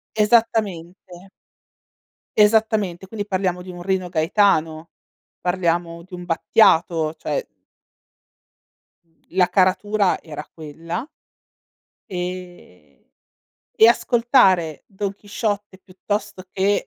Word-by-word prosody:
Esattamente. 210 Hz, -5 st, +1 dB, 1.4 s
Esattamente. 210 Hz, -4 st, +2 dB
Quindi 205 Hz, 0 st, -5 dB
parliamo 185 Hz, -2 st, -1 dB
di 180 Hz, 0 st, -9 dB
un 175 Hz, 0 st, -10 dB
Rino 185 Hz, -1 st, -1 dB
Gaetano, 160 Hz, -2 st, +1 dB, 0.5 s
parliamo 170 Hz, -2 st, -1 dB
di 185 Hz, +1 st, -19 dB
un 175 Hz, 0 st, -9 dB
Battiato, 165 Hz, -3 st, +3 dB
cioè -, -, -3 dB, 1.8 s
La 180 Hz, 0 st, +2 dB
caratura 200 Hz, +1 st, +2 dB
era 150 Hz, -2 st, -8 dB
quella 165 Hz, -, -6 dB, 1.0 s
ehm 180 Hz, -, -8 dB, 0.8 s
e 225 Hz, -, +8 dB
ascoltare 230 Hz, -, +3 dB
Don 200 Hz, 0 st, -4 dB
Chisciotte 205 Hz, -1 st, -4 dB
piuttosto 195 Hz, +1 st, -5 dB
che, 200 Hz, +2 st, 0 dB
185 Hz, 85 wpm, -21 LUFS, 170-210 Hz, 1.8 s, e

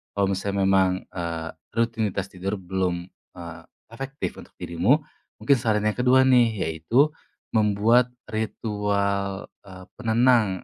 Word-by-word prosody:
kalau 100 Hz, -1 st, +1 dB
misalnya 100 Hz, +1 st, -1 dB
memang, 95 Hz, -1 st, +2 dB
eee, 85 Hz, -2 st, -4 dB, 0.3 s
rutinitas 110 Hz, -4 st, -1 dB
tidur 95 Hz, +3 st, -3 dB
belum, 90 Hz, -2 st, -2 dB, 0.3 s
eee, 85 Hz, -2 st, -9 dB, 0.3 s
efektif 135 Hz, +5 st, -5 dB
untuk -, -, -15 dB
dirimu, 100 Hz, -, +1 dB, 0.4 s
mungkin 140 Hz, -, +4 dB
saran 110 Hz, -2 st, +1 dB
yang 110 Hz, 0 st, +1 dB
kedua 130 Hz, +1 st, +5 dB
nih, 125 Hz, -3 st, +5 dB
yaitu 95 Hz, -, +2 dB, 0.4 s
membuat 110 Hz, +3 st, +3 dB, 0.2 s
ritual, 100 Hz, -2 st, -2 dB, 0.2 s
eee, 95 Hz, -1 st, -11 dB, 0.2 s
penenang 115 Hz, -4 st, +2 dB
100 Hz, 120 wpm, -24 LUFS, 95-115 Hz, 0.4 s, kedua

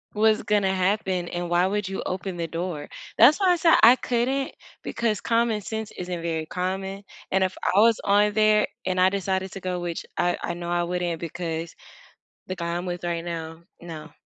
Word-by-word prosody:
Was 215 Hz, 0 st, +3 dB
gonna 200 Hz, -2 st, +1 dB
happen 185 Hz, -2 st, 0 dB
and 175 Hz, 0 st, -4 dB
why 175 Hz, +2 st, +3 dB
would 205 Hz, 0 st, -1 dB
you 195 Hz, -, -4 dB
open 185 Hz, 0 st, -4 dB
the 165 Hz, -1 st, -2 dB
door. 165 Hz, -2 st, -4 dB, 0.3 s
That's 265 Hz, -, +7 dB
why 375 Hz, -2 st, +4 dB
I -, -, +4 dB
said 330 Hz, 0 st, +5 dB
I 240 Hz, +3 st, +9 dB
couldn't 255 Hz, +3 st, -1 dB, 0.3 s
because 220 Hz, -3 st, -1 dB
common 230 Hz, -2 st, +1 dB
sense 220 Hz, +1 st, -5 dB
isn't 180 Hz, -1 st, -5 dB
very 160 Hz, -2 st, -2 dB
common, 190 Hz, +2 st, -3 dB, 0.3 s
and 190 Hz, 0 st, +3 dB
if 185 Hz, 0 st, -1 dB, 0.2 s
I 200 Hz, -, +6 dB
was 230 Hz, +1 st, +5 dB
on 205 Hz, +1 st, +3 dB
there 215 Hz, -1 st, +4 dB, 0.2 s
and 185 Hz, 0 st, 0 dB
I 185 Hz, +1 st, +6 dB
decided 190 Hz, -1 st, -2 dB
to 195 Hz, -, -7 dB
go, 180 Hz, -1 st, -3 dB
which 175 Hz, -1 st, -5 dB
I 175 Hz, 0 st, +2 dB
I 175 Hz, -, -3 dB
know 175 Hz, 0 st, -5 dB
I 175 Hz, 0 st, +1 dB
wouldn't 175 Hz, -2 st, -2 dB
because 165 Hz, 0 st, -5 dB, 0.7 s
the 185 Hz, -, -4 dB
guy 170 Hz, -1 st, -4 dB
I'm 175 Hz, +1 st, -3 dB
with 175 Hz, 0 st, -4 dB
right 170 Hz, -1 st, -2 dB
now, 165 Hz, -1 st, -6 dB, 0.2 s
no., 160 Hz, -2 st, -9 dB
185 Hz, 200 wpm, -25 LUFS, 175-210 Hz, 0.7 s, I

